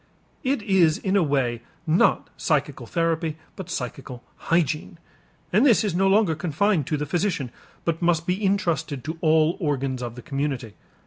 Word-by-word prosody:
It 265 -4 0
is 185 -7 +4
in 195 0 -1
a 200 - +5
way 135 -6 0 0.2
not 165 +3 +2
psychical - - -1
therapy 165 -2 -1 0.2
but 185 -2 -8
psychical 125 -4 -5 0.3
hygiene. 165 +1 0 0.6
And 210 +6 +5
this 245 -7 +5
is 205 -5 -1
no 190 +2 +2
longer 195 -3 +4
confined 165 +1 0
to 150 - 0
the 150 - -2
physician 170 - -1 0.3
but 165 0 -1
must 170 -1 +2
be 185 +4 -1
intrusted 170 - 0
to 160 +1 -5
all 160 0 +3
organs 135 -6 -1
of 120 -1 -5
the 125 - -10
community. 135 -6 -3
165 Hz, 165 wpm, -24 LUFS, 140-185 Hz, 0.6 s, a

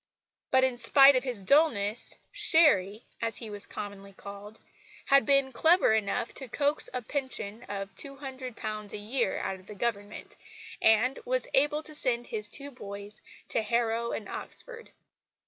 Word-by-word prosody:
But, 260 0 +4
in 260 -2 +1
spite 270 +4 +7
of 255 - +1
his 245 -7 -4
dulness, 230 -5 +2
"Sherry" 295 - +3 0.2
as 230 -2 -2
he 225 -3 -8
was 205 -1 -3
commonly 200 -1 -8
called 200 +2 -10 0.5
had 275 -4 +4
been 275 -1 +3
clever 320 +1 +4
enough 220 +3 -1
to 265 - -5
coax 285 +5 +1
a 250 -1 -4
pension 235 -5 -3
of 195 -1 -5
£200 255 -5 -5
a - - -4
year 215 0 -1
out 190 - -3
of 185 - -20
the 210 - -9
Government, 205 -1 -4 0.5
and 225 +4 +3
was - - -1
able 295 +3 +2
to 310 - -9
send 245 -5 0
his 210 -3 -2
two 285 0 -6
boys 205 -3 -9 0.3
to - - +1
Harrow 235 +1 0
and 210 - -5
Oxford. 470 -2 -8
235 Hz, 155 wpm, -29 LUFS, 205-275 Hz, 0.5 s, spite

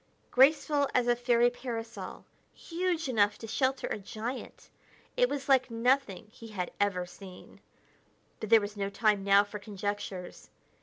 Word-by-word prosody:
Graceful 285 +1 +4
as 250 - +3
a 240 0 +3
fairy 240 0 +3
parasol, 230 -2 -7 0.3
huge 340 -2 -2
enough 205 -5 +2
to - - -8
shelter 260 +4 0
a - - -3
giant, 220 +5 -7 0.4
it - - +3
was 280 -1 -4
like 260 -2 +4
nothing 230 -3 +1
he 230 -1 -12
had 190 -5 -4
ever 200 -3 +1
seen. 185 +1 -13 0.8
But 215 - -5
there 225 -1 +7
was 205 +1 -5
no 200 -1 -2
time 210 -1 +1
now 200 0 +5
for 205 0 -8
conjectures. 200 -3 -5
225 Hz, 150 wpm, -30 LUFS, 205-260 Hz, 0.8 s, there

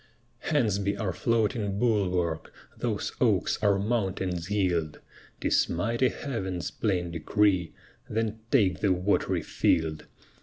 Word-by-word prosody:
Hence 120 -11 +1
be 100 0 -1
our 100 -5 -2
floating 110 -1 0
bulwark 90 -8 0 0.2
Those - - -2
oaks - - +2
our 100 -2 +3
mountains 95 -5 -1
yield; 90 -7 0 0.4
'Tis - - +2
mighty 115 +9 +1
Heaven's 95 - -4
plain 90 -5 -1
decree 90 +2 +1 0.3
Then 110 0 -1
take 100 -9 +3
the 100 - +2
wat'ry 90 +3 0
field! 80 -1 0
100 Hz, 115 wpm, -28 LUFS, 90-110 Hz, 0.4 s, our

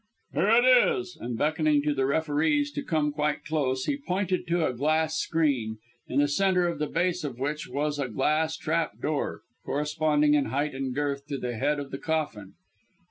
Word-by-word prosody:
Here 165 +8 +2
it 235 +2 +5
is" 365 - +4
and 120 -1 -4
beckoning 155 0 +2
to 150 0 +1
the 135 -2 0
referees 160 - +1
to 290 - -4
come 155 - 0
quite 150 0 -1
close, 130 -4 -1
he 280 - 0
pointed 185 -7 -2
to 170 -1 +1
a 130 - -1
glass 155 +4 +1
screen, 140 -12 0 0.3
in 130 - -3
the 145 - +3
centre 180 +3 +2
of 170 - -3
the 150 - 0
base 180 +3 0
of 135 -5 -4
which 145 +3 -3
was 145 +3 -2
a 135 - -1
glass 155 +6 +1
trap 160 +1 -1
door, 150 -1 -2 0.2
corresponding 150 0 +1
in 145 -2 +3
height 145 +2 -1
and 130 -1 -3
girth 140 -1 -2
to 145 -1 -3
the 125 -2 -4
head 145 +6 0
of 140 -1 -7
the 135 - -5
coffin. 145 -12 -3
150 Hz, 190 wpm, -27 LUFS, 140-165 Hz, 0.3 s, it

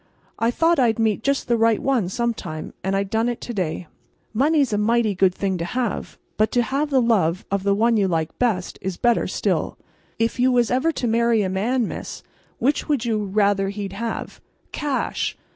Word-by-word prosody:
I 230 - +2
thought 330 +6 +2
I'd 230 -4 +3
meet 220 -2 +1
just 275 +3 0
the 235 -1 +2
right 225 -1 +3
one 250 -9 0
some 235 +4 0
time, 155 -7 -7
and 190 +1 0
I 195 - +1
done 220 +4 0
it 240 - -3
to 240 - -5
day. 180 -3 -2 0.5
Money's 280 0 +2
a 205 - +1
mighty 225 0 +2
good 190 0 +3
thing 190 -2 -1
to - - -2
have, 240 +2 -3 0.2
but 215 +1 +2
to 245 - +3
have 275 +6 -1
the 270 -2 +3
love 195 -8 +1
of 200 -1 +1
the 200 +1 +2
one 230 +2 +3
you 200 -2 +2
like 165 -3 -2
best 215 -8 -1
is 185 -2 -4
better 240 -1 +2
still. - - -1 0.4
If 230 +2 -1
you 255 +1 +4
was 240 -2 +2
ever 260 +6 +2
to 275 - -3
marry 230 -1 +2
a 190 - -1
man, 225 +5 0
Miss, - - -7 0.3
which 280 +5 0
would 275 -5 +1
you 215 -3 0
rather 200 0 +1
he'd 200 -1 -5
have?" 230 +3 -5 0.3
"Cash!" 290 -3 -2
225 Hz, 205 wpm, -22 LUFS, 195-245 Hz, 0.5 s, you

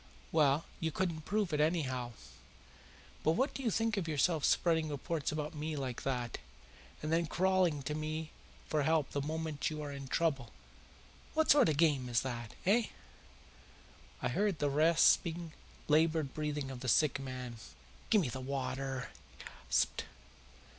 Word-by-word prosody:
Well, 150 -1 +3
you 160 - 0
couldn't 160 -2 -2
prove 205 -5 0
it, 150 - +1
anyhow. 130 -7 0 1.1
But 160 - +4
what 260 - +1
do - - -5
you 245 - +1
think 225 0 0
of 180 -4 -1
yourself 155 0 +1
spreading 160 -2 +2
reports 150 +1 -2
about 150 +1 -3
me 155 +1 -3
like 130 -4 -4
that, 125 -3 -2 0.6
and 155 +1 -1
then 165 0 +2
crawling 180 -5 +2
to 150 - -2
me 155 +1 -3 0.4
for 155 - +1
help 155 -1 +2
the 140 - -1
moment 155 0 -2
you 155 -1 -5
are 145 - -5
in 140 -1 -7
trouble? 135 -5 0 0.9
What 315 0 +4
sort 280 - +6
of 155 - +1
a - - -7
game 145 -6 +3
is 120 -1 +2
that 120 -3 -5
eh?" 215 +4 +4 1.4
I - - +1
heard 205 -4 +1
the 145 -1 0
rasping, 165 +2 +3 0.3
laboured 155 -1 +3
breathing 150 -3 -3
of 130 - -7
the 130 - -3
sick 135 +4 +3
man. 130 -3 -6 0.5
"Give 215 - +5
me 145 - -1
the 130 +2 -5
water!" 135 0 -3 0.3
he - - -11
gasped. - - -1
155 Hz, 160 wpm, -33 LUFS, 135-165 Hz, 1.4 s, sort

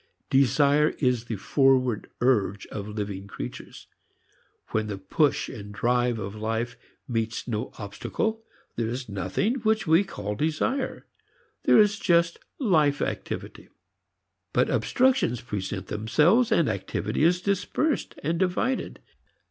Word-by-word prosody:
Desire 145 +3 +4
is 125 -4 +1
the 115 - -3
forward 130 +1 +2
urge 105 -6 +2
of 105 -1 -5
living 100 -2 -5
creatures. - - -8 0.8
When 110 -1 -1
the 100 -2 -4
push 135 +10 +1
and 105 -1 -8
drive 120 +2 +1
of 100 -2 -5
life 115 +3 -2 0.3
meets 115 -1 -2
no 110 -3 -3
obstacle, 220 - -3 0.3
there 115 -1 0
is 125 +2 -4
nothing 100 - -1
which 220 -2 +1
we 165 +4 +5
call 105 - -5
desire. 160 - -1 0.6
There - - +6
is 205 -1 +4
just 170 -3 +2 0.2
life 155 - +3
activity. - - -4 0.8
But - - +2
obstructions 260 - +2
present 95 -4 -4
themselves, 150 - +3
and 170 -8 +3
activity 105 +4 -2
is 175 +2 +4
dispersed 200 - -1
and 165 +3 0
divided. 190 +8 -1
125 Hz, 125 wpm, -26 LUFS, 105-175 Hz, 0.8 s, There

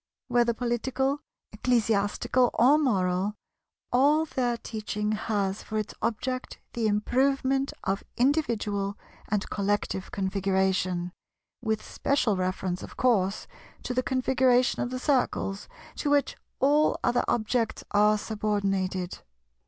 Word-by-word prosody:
Whether 240 -1 +3
political, 260 +4 -1 0.3
ecclesiastical, 225 +2 +1
or 270 +6 +5
moral, 195 -6 +1 0.6
all 290 +5 +4
their 245 -5 -1
teaching 210 -2 -3
has 210 -2 -1
for 215 - -4
its 215 -1 -3
object 255 +3 -2 0.2
the 230 -2 0
improvement 265 +5 +1
of 195 +1 -1
individual 220 -8 0 0.3
and 210 -1 0
collective 200 -1 -1
Configuration—with 190 +2 -2
special 255 -7 +1
reference 185 0 -2
of - - -10
course 210 -6 +2 0.4
to 250 - -3
the 255 - +1
Configuration 255 -1 +2
of 245 - -1
the 255 - -3
Circles, 250 -7 0 0.3
to 295 - -1
which 285 -1 +2 0.2
all 295 +3 +3
other 240 0 +2
objects 230 0 0
are 210 +1 +4
subordinated. 195 -4 -1
220 Hz, 110 wpm, -27 LUFS, 200-255 Hz, 0.6 s, or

